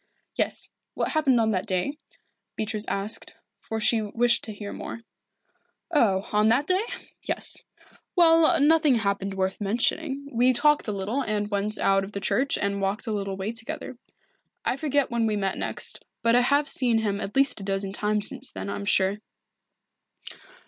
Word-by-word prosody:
"Yes -, -, -1 dB, 0.3 s
what -, -, -1 dB
happened 280 Hz, -6 st, +3 dB
on 220 Hz, -1 st, +2 dB
that 190 Hz, +1 st, -1 dB
day?" 215 Hz, +11 st, -1 dB, 0.6 s
Beatrice 215 Hz, 0 st, -1 dB
asked, 200 Hz, +3 st, -1 dB, 0.2 s
for 220 Hz, -, -5 dB
she 220 Hz, +1 st, +3 dB
wished 235 Hz, +3 st, +2 dB
to 220 Hz, -, -6 dB
hear 205 Hz, -1 st, -7 dB
more. 230 Hz, -, -7 dB, 0.9 s
"Oh, 205 Hz, -, +2 dB
on 210 Hz, +1 st, +4 dB
that 245 Hz, +6 st, +3 dB
day? 370 Hz, +4 st, +2 dB, 0.4 s
Yes. -, -, 0 dB, 0.5 s
Well, 330 Hz, -3 st, +5 dB
nothing 300 Hz, -1 st, +4 dB
happened 200 Hz, -3 st, -1 dB
worth 190 Hz, +1 st, -2 dB
mentioning. 270 Hz, +7 st, 0 dB
We 250 Hz, +2 st, +4 dB
talked 295 Hz, +2 st, +3 dB
a -, -, -1 dB
little 205 Hz, +7 st, -2 dB
and 210 Hz, -3 st, -2 dB
went 205 Hz, +1 st, -1 dB
out 195 Hz, 0 st, +2 dB
of 195 Hz, +2 st, -8 dB
the 200 Hz, -, -3 dB
church 265 Hz, +7 st, +1 dB
and 200 Hz, 0 st, -1 dB
walked 195 Hz, +5 st, -1 dB
a 225 Hz, -, -3 dB
little 195 Hz, -2 st, -3 dB
way 195 Hz, +3 st, -3 dB
together. 245 Hz, +2 st, -7 dB, 0.7 s
I -, -, +1 dB
forget 285 Hz, -1 st, 0 dB
when 235 Hz, -1 st, +1 dB
we 215 Hz, -, 0 dB
met 195 Hz, -2 st, -1 dB
next, -, -, -3 dB, 0.2 s
but 230 Hz, 0 st, +4 dB
I 245 Hz, -, +5 dB
have 285 Hz, +4 st, +2 dB
seen 245 Hz, -5 st, +1 dB
him 205 Hz, -2 st, -1 dB
at 195 Hz, -, -6 dB
least 275 Hz, -4 st, +3 dB
a -, -, -7 dB
dozen 195 Hz, 0 st, -2 dB
times 210 Hz, 0 st, 0 dB
since -, -, -2 dB
then, 95 Hz, +1 st, -5 dB
I -, -, -3 dB
am 100 Hz, -, -6 dB
sure." 195 Hz, -, +2 dB
220 Hz, 175 wpm, -26 LUFS, 200-265 Hz, 0.9 s, Well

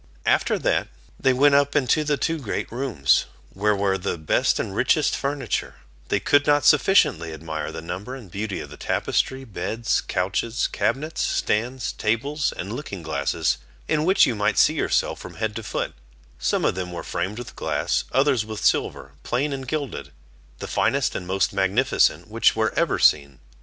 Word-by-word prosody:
After -, -, +2 dB
that, -, -, 0 dB, 0.3 s
they 130 Hz, -, +3 dB
went 140 Hz, +3 st, +4 dB
up 140 Hz, 0 st, +3 dB
into 145 Hz, +2 st, +2 dB
the 150 Hz, -1 st, 0 dB
two 165 Hz, +2 st, -1 dB
great 120 Hz, -8 st, -4 dB
rooms, 120 Hz, -, +1 dB, 0.3 s
where 105 Hz, +2 st, +1 dB
were 100 Hz, -1 st, 0 dB
the 90 Hz, -, -2 dB
best 80 Hz, -1 st, +1 dB
and 95 Hz, -, -3 dB
richest 140 Hz, +6 st, +2 dB
furniture; 140 Hz, -4 st, -2 dB, 0.3 s
they -, -, +1 dB
could 145 Hz, 0 st, +3 dB
not 145 Hz, 0 st, +3 dB
sufficiently 140 Hz, -, +4 dB
admire 80 Hz, -1 st, -5 dB
the 80 Hz, -, -7 dB
number 95 Hz, +9 st, -6 dB
and 115 Hz, -9 st, -11 dB
beauty 100 Hz, +1 st, -4 dB
of -, -, -10 dB
the -, -, -10 dB
tapestry, 130 Hz, 0 st, -1 dB
beds, 110 Hz, +1 st, -2 dB
couches, 100 Hz, +5 st, -1 dB
cabinets, 155 Hz, +4 st, -1 dB
stands, 120 Hz, +4 st, -1 dB
tables, 140 Hz, +7 st, -1 dB
and 100 Hz, +4 st, -6 dB
looking 105 Hz, -, -6 dB
glasses 70 Hz, -3 st, -1 dB, 0.3 s
in 155 Hz, -1 st, +1 dB
which 190 Hz, +4 st, +5 dB
you 125 Hz, -, 0 dB
might 105 Hz, -1 st, 0 dB
see -, -, +5 dB
yourself -, -, 0 dB
from -, -, -10 dB
head 110 Hz, -1 st, -2 dB
to 115 Hz, -, -4 dB
foot; -, -, -3 dB, 0.5 s
some -, -, 0 dB
of -, -, +2 dB
them 90 Hz, -1 st, -4 dB
were 85 Hz, -, -6 dB
framed 95 Hz, +5 st, -3 dB
with 120 Hz, -, -8 dB
glass, -, -, -1 dB
others 135 Hz, -4 st, +3 dB
with 110 Hz, -1 st, -6 dB
silver, 70 Hz, -, 0 dB
plain 140 Hz, +4 st, -1 dB
and 135 Hz, -1 st, -6 dB
gilded, 145 Hz, -1 st, -4 dB, 0.5 s
the -, -, -6 dB
finest -, -, +1 dB
and 90 Hz, -, -5 dB
most 95 Hz, +1 st, 0 dB
magnificent 95 Hz, 0 st, +2 dB
which -, -, +2 dB
were -, -, 0 dB
ever -, -, +1 dB
seen. 70 Hz, -3 st, +3 dB
115 Hz, 175 wpm, -23 LUFS, 95-140 Hz, 0.5 s, which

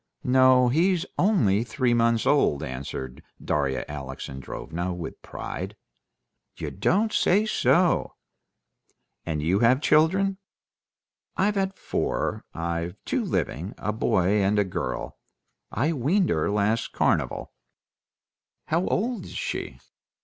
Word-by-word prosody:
"No; 130 Hz, -1 st, +5 dB
he's 175 Hz, +6 st, +2 dB
only 115 Hz, -, +3 dB
three 125 Hz, -1 st, 0 dB
months 115 Hz, -1 st, +2 dB
old," 110 Hz, -, +3 dB
answered 65 Hz, 0 st, -6 dB, 0.2 s
Darya 70 Hz, -3 st, -1 dB
Alexandrovna 75 Hz, +5 st, -5 dB
with 85 Hz, -2 st, -7 dB
pride. -, -, -6 dB, 0.8 s
"You -, -, -4 dB
don't 215 Hz, +4 st, +1 dB
say 205 Hz, +4 st, +3 dB
so!" 180 Hz, -4 st, +2 dB, 1.1 s
"And 80 Hz, -2 st, -1 dB
have -, -, -3 dB
you 95 Hz, +4 st, +2 dB
any 125 Hz, +3 st, +5 dB
children?" 190 Hz, +7 st, +3 dB, 1.0 s
"I've 205 Hz, +2 st, +2 dB
had 195 Hz, -1 st, -1 dB
four; -, -, -2 dB
I've 85 Hz, +1 st, -3 dB
two -, -, 0 dB
living—a 95 Hz, +7 st, -2 dB
boy 100 Hz, -1 st, +2 dB
and 100 Hz, +2 st, +2 dB
a 105 Hz, -, +4 dB
girl. 90 Hz, -9 st, -4 dB, 0.5 s
I 145 Hz, +10 st, 0 dB
weaned 165 Hz, -, +1 dB
her 80 Hz, +3 st, +1 dB
last 105 Hz, +2 st, 0 dB
carnival." -, -, 0 dB, 1.2 s
"How 170 Hz, +4 st, +1 dB
old 225 Hz, -2 st, -1 dB
is -, -, -10 dB
she?" 60 Hz, -, -4 dB
115 Hz, 115 wpm, -25 LUFS, -, 1.2 s, No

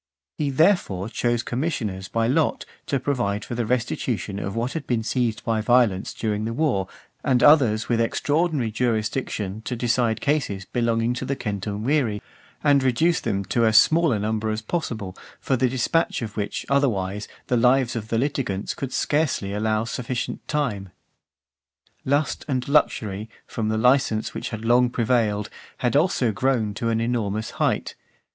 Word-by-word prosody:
He, 145 Hz, -2 st, -1 dB
therefore, 135 Hz, -, +2 dB
chose 120 Hz, +1 st, 0 dB
commissioners 120 Hz, -, -3 dB
by 115 Hz, 0 st, 0 dB
lot 150 Hz, +5 st, +1 dB, 0.2 s
to 140 Hz, -, 0 dB
provide 120 Hz, -7 st, -1 dB
for -, -, -6 dB
the 120 Hz, -2 st, -2 dB
restitution 115 Hz, -4 st, -1 dB
of 100 Hz, 0 st, -4 dB
what 120 Hz, +3 st, -1 dB
had 165 Hz, -, -5 dB
been 115 Hz, -3 st, 0 dB
seized 120 Hz, -1 st, -1 dB
by 110 Hz, -1 st, +1 dB
violence 115 Hz, -5 st, +2 dB
during 105 Hz, -1 st, -2 dB
the 115 Hz, +1 st, -3 dB
war, 125 Hz, -11 st, +1 dB, 0.4 s
and 125 Hz, -3 st, +2 dB
others 125 Hz, -8 st, +5 dB
with 115 Hz, -1 st, +1 dB
extraordinary 145 Hz, 0 st, 0 dB
jurisdiction 110 Hz, -3 st, -2 dB
to 125 Hz, -, -4 dB
decide 120 Hz, -1 st, +1 dB
causes 140 Hz, -10 st, -1 dB
belonging 115 Hz, 0 st, 0 dB
to 125 Hz, -, -4 dB
the 140 Hz, +1 st, -2 dB
centumviri, 105 Hz, +3 st, -1 dB, 0.4 s
and 140 Hz, -1 st, +5 dB
reduce 130 Hz, +7 st, +2 dB
them 100 Hz, -3 st, -2 dB
to 115 Hz, -, +1 dB
as 110 Hz, -1 st, +5 dB
small 160 Hz, +5 st, +5 dB
a 110 Hz, -, +1 dB
number 110 Hz, +1 st, -1 dB
as 110 Hz, 0 st, -3 dB
possible, 110 Hz, -, -3 dB, 0.2 s
for 135 Hz, -, 0 dB
the 130 Hz, 0 st, +2 dB
dispatch 130 Hz, +3 st, 0 dB
of 105 Hz, -2 st, -6 dB
which, 105 Hz, -1 st, -3 dB
otherwise, 105 Hz, -8 st, 0 dB, 0.2 s
the 125 Hz, -, 0 dB
lives 125 Hz, +1 st, +3 dB
of 110 Hz, -2 st, -4 dB
the 115 Hz, -, 0 dB
litigants 120 Hz, -7 st, -1 dB
could 135 Hz, -2 st, -5 dB
scarcely 145 Hz, -12 st, 0 dB
allow 110 Hz, +1 st, 0 dB
sufficient 120 Hz, +1 st, -4 dB
time. 110 Hz, -11 st, -2 dB, 1.2 s
XI. -, -, -5 dB
Lust 145 Hz, +2 st, 0 dB
and 130 Hz, -4 st, -1 dB
luxury, 110 Hz, -8 st, +1 dB, 0.2 s
from 110 Hz, -2 st, -3 dB
the 110 Hz, -, 0 dB
licence 115 Hz, -2 st, +2 dB
which -, -, -4 dB
had 110 Hz, 0 st, -6 dB
long 120 Hz, +1 st, +4 dB
prevailed, 110 Hz, -4 st, 0 dB, 0.3 s
had 125 Hz, +1 st, 0 dB
also 145 Hz, -6 st, +2 dB
grown 115 Hz, -2 st, 0 dB
to 115 Hz, +2 st, -2 dB
an 115 Hz, 0 st, +1 dB
enormous 110 Hz, -2 st, -1 dB
height. -, -, 0 dB
115 Hz, 165 wpm, -24 LUFS, 110-130 Hz, 1.2 s, others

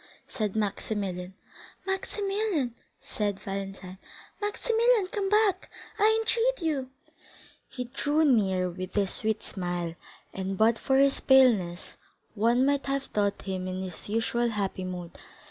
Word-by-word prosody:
said 215 Hz, -5 st, -3 dB
Maximilian. 195 Hz, -3 st, -2 dB, 0.5 s
"Maximilian!" 390 Hz, -, -1 dB, 0.3 s
said 205 Hz, -2 st, -3 dB
Valentine, 195 Hz, -1 st, -6 dB, 0.4 s
"Maximilian, 455 Hz, +1 st, +2 dB
come 405 Hz, -4 st, -1 dB
back, 420 Hz, -3 st, +2 dB, 0.3 s
I 440 Hz, +2 st, +5 dB
entreat 470 Hz, +2 st, +1 dB
you!" 270 Hz, -5 st, -1 dB, 0.8 s
He 250 Hz, -, -4 dB
drew 290 Hz, +5 st, +1 dB
near 190 Hz, -9 st, +3 dB
with 185 Hz, +1 st, -6 dB
his 200 Hz, -2 st, +1 dB
sweet 220 Hz, -1 st, 0 dB
smile, 175 Hz, -3 st, -3 dB, 0.4 s
and 190 Hz, 0 st, -3 dB
but 225 Hz, +2 st, +4 dB
for 265 Hz, -1 st, +2 dB
his 275 Hz, 0 st, +4 dB
paleness 220 Hz, -10 st, +3 dB, 0.4 s
one 235 Hz, +4 st, +3 dB
might 280 Hz, 0 st, +1 dB
have 275 Hz, 0 st, 0 dB
thought 205 Hz, -1 st, 0 dB
him 185 Hz, -1 st, -3 dB
in 185 Hz, 0 st, -3 dB
his 185 Hz, +1 st, -8 dB
usual 230 Hz, +2 st, +1 dB
happy 195 Hz, -3 st, -2 dB
mood. 180 Hz, -2 st, -7 dB
220 Hz, 130 wpm, -28 LUFS, 190-290 Hz, 0.8 s, I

